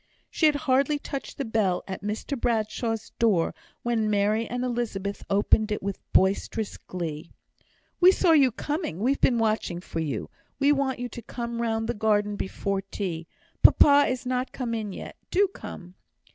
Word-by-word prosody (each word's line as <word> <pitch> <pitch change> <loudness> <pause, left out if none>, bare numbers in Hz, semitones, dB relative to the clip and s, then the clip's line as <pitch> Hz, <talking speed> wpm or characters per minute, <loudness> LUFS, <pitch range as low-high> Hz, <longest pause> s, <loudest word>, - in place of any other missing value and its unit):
She 315 - +3
had 300 - +3
hardly 280 +1 +2
touched 275 -1 -6
the 275 - -2
bell 215 -5 0
at 190 -1 -5
Mr 210 +7 -3
Bradshaw's 225 -1 -1
door, 205 -8 +2 0.3
when 230 -3 +1
Mary 210 +2 +1
and 245 +1 -3
Elizabeth 220 -5 -3
opened 210 +2 +3
it 210 - -2
with 200 -1 -3
boisterous 200 +3 +1
glee. 165 -3 -6 0.7
"We 365 +1 +8
saw 370 -2 +3
you 280 -5 +6
coming 295 - -3
we've 255 +8 0
been 245 - +4
watching 215 -6 0
for 170 -2 -6
you 145 -8 -3 0.3
we 280 +1 +4
want 275 -2 +1
you 245 - -3
to 235 - -8
come 235 0 -5
round 225 -1 -1
the 240 - 0
garden 210 -1 +1
before 195 0 -2
tea; 180 -4 -5 0.3
papa 285 0 +7
is 255 0 -3
not 255 0 -1
come 245 -3 -3
in 215 -3 -3
yet. - - -8
Do 395 +2 +3
come!" 180 - -10
225 Hz, 170 wpm, -26 LUFS, 200-255 Hz, 0.7 s, We